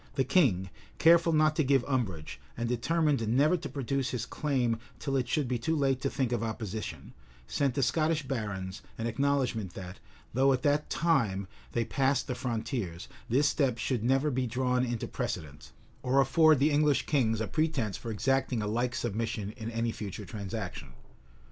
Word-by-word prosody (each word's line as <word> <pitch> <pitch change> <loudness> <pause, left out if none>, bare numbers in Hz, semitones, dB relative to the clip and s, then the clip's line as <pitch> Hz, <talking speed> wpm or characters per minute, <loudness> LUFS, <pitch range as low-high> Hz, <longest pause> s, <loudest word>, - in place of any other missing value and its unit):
the 135 - +2
king, 110 - +2 0.3
careful 170 0 +5
not 155 -1 +3
to 155 - +2
give 135 -2 +3
umbrage, 100 - -2 0.2
and 120 0 -1
determined 140 0 +1
never 140 +9 +4
to 170 - -5
produce 135 0 -2
his 120 -2 -3
claim 125 -7 0 0.2
till 135 -2 -2
it 130 -2 +1
should 145 +1 0
be 125 -1 -1
too 160 +7 0
late 135 -3 +1
to 135 - 0
think 130 -4 -1
of 120 - 0
opposition, 110 -9 -5 0.3
sent 135 - 0
the 140 - +1
Scottish 155 +4 +1
barons 100 -6 -4 0.2
an 115 - -3
acknowledgment, 120 -5 0
that, 90 0 -8 0.3
though 135 +3 +4
at 125 - -2
that 145 +1 +2
time 115 - +1 0.3
they 115 -1 +1
passed 135 +1 +1
the 130 - -3
frontiers, 115 - -3 0.2
this 140 +5 +3
step 135 -6 +1
should 120 -2 -1
never 135 +4 +2
be 130 -1 0
drawn 125 +1 +1
into 120 -2 -2
precedent, 75 -2 -5 0.3
or 130 +2 +2
afford 155 +3 +5
the 145 +4 +3
English 145 -1 +3
kings 115 -7 +1
a 110 - 0
pretence 135 - 0
for 115 - -6
exacting 125 +1 0
a - - -2
like 120 +3 -1
submission 110 -2 -2
in 115 0 -6
any 115 0 -1
future 105 -1 -6
transaction. 100 - -6
125 Hz, 175 wpm, -30 LUFS, 110-140 Hz, 0.3 s, careful